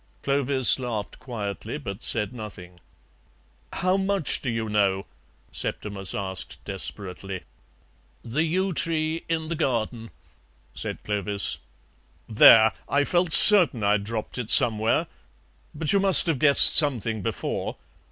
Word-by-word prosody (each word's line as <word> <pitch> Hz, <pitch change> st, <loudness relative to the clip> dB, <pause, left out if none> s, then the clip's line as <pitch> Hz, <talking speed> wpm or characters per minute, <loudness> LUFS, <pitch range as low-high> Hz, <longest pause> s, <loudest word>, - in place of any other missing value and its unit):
Clovis 140 Hz, -2 st, +2 dB
laughed 115 Hz, -5 st, -6 dB
quietly, 115 Hz, -1 st, -7 dB
but 100 Hz, -10 st, -9 dB
said 110 Hz, +1 st, -2 dB
nothing. 95 Hz, -6 st, -11 dB, 0.9 s
"How 185 Hz, +1 st, -1 dB
much 195 Hz, -3 st, -1 dB
do 130 Hz, -, -4 dB
you 115 Hz, -1 st, -4 dB
know?" 100 Hz, -2 st, -1 dB, 0.5 s
Septimus 100 Hz, -3 st, -4 dB
asked 95 Hz, -2 st, -6 dB
desperately. 95 Hz, -1 st, -6 dB, 0.8 s
"The 130 Hz, +7 st, -2 dB
yew 185 Hz, +4 st, -2 dB
tree 160 Hz, 0 st, -3 dB
in 160 Hz, -1 st, -3 dB
the 170 Hz, -, -3 dB
garden," 120 Hz, -6 st, -3 dB, 0.6 s
said -, -, -7 dB
Clovis. 100 Hz, -1 st, -2 dB, 0.7 s
"There! 110 Hz, 0 st, +5 dB, 0.2 s
I 145 Hz, 0 st, +1 dB
felt 175 Hz, +2 st, -1 dB
certain 175 Hz, -, +7 dB
I'd 100 Hz, 0 st, 0 dB
dropped 110 Hz, +3 st, -6 dB
it 115 Hz, -3 st, -6 dB
somewhere. 110 Hz, -1 st, +2 dB, 0.7 s
But 150 Hz, +3 st, -1 dB
you 200 Hz, -, +2 dB
must 195 Hz, -1 st, +5 dB
have 160 Hz, -6 st, -2 dB
guessed 140 Hz, 0 st, +7 dB
something 120 Hz, -8 st, +1 dB
before. -, -, -5 dB
120 Hz, 125 wpm, -23 LUFS, 105-155 Hz, 0.9 s, certain